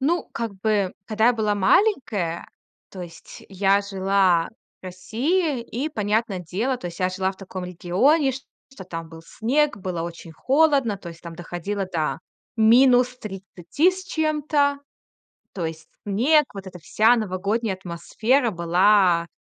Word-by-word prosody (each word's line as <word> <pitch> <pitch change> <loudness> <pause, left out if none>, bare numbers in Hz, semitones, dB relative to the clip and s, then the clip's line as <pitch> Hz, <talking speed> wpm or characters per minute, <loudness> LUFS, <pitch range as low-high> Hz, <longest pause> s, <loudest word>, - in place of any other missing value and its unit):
Ну, 335 +6 0
как 230 -2 -4
бы, 205 -3 +1
когда 220 0 +1
я 245 - +6
была 215 -3 0
маленькая, 205 - +1 0.4
то 190 - -9
есть 165 -1 -12
я 195 +1 +2
жила 195 -3 +1 0.3
в - - -16
России. 260 - -1
И, 245 +5 -4
понятное 210 -5 -1
дело, 215 +10 -2
то 180 - -8
есть 170 0 -8
я 185 - +2
жила 190 +1 -2
в - - -21
таком 190 -1 -7
регионе, 195 - +1
шт 270 +2 -8 0.3
что 195 -8 -10
там 165 -2 -7
был 165 0 -12
снег, 280 - 0
было 180 -3 -4
очень 170 0 -8
холодно, 275 - +2
то 180 - -9
есть 165 0 -12
там 170 -1 -8
доходило 175 +4 -4
до 160 -4 -2 0.4
-30 240 - +2
с 375 0 -8
чем-то. 300 -4 0 0.8
То 180 - -3
есть 160 0 -8 0.2
снег, 270 +10 +3
вот 195 -1 -8
эта 185 -1 -9
вся 220 +8 +3
новогодняя 205 0 -2
атмосфера 215 +8 0
была 175 0 +3
200 Hz, 150 wpm, -23 LUFS, 180-250 Hz, 0.8 s, я